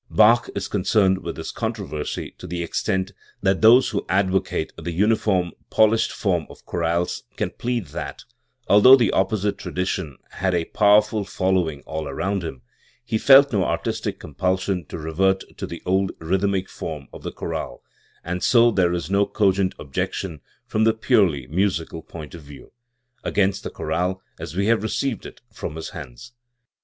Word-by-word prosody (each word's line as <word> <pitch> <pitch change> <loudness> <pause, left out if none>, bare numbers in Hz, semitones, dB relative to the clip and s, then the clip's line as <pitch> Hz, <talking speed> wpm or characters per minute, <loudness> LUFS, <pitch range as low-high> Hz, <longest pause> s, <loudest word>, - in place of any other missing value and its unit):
Bach 115 +3 +5
is - - -2
concerned 95 -1 +2
in - - -4
this - - -6
controversy 75 +1 -4
to - - -8
the 85 0 -3
extent 95 +2 -1 0.3
that 95 -1 +2
those 120 +4 +7
who 105 - -2
advocate 95 -3 0
the 85 +1 -5
uniform 95 -1 +1 0.2
polished 110 +1 +3
form 90 -7 -1
of - - -15
chorales 85 0 -1
can - - -2
plead 120 -4 -2
that, - - -6 0.4
although 105 +7 +8
the 120 -5 +2
opposite 100 +1 0
tradition 90 -5 -3
had 95 0 -1
a 85 -1 0
powerful 105 +2 +3
following 90 -6 0
all 80 -1 -5
round 100 -1 -2
him, 65 -7 -7 0.4
he 115 -2 -1
felt 140 +1 +7
no 100 -3 +2
artistic - - -2
com 75 - -11
pulsion 95 +1 -1
to - - -6
revert 95 +5 +1
to - - -5
the 85 - -8
old 95 +1 +1
rhythmic 95 +3 0
form - - -7
of - - -10
the - - -5
chorale, - - -5 0.4
and 90 +1 -3
so 120 -1 +5
there 90 -4 +2
is 85 -3 -3
no 100 +2 +2
cogent 95 -2 +1
objection, 75 +3 -4 0.2
from 110 - 0
the 110 0 +3
purely 100 - +2
musical 85 +1 -1
point 80 -2 -10
of 85 - -9
view, 70 -2 -13 0.5
against 100 -1 +1
the - - -5
chorale 90 +2 -2 0.2
as - - -7
we 100 +1 +1
have 115 -1 +3
received 115 +2 -2
it - - -14
from 80 -7 -6
his 80 - -6
hands. 65 - -10
95 Hz, 165 wpm, -23 LUFS, 85-105 Hz, 0.5 s, although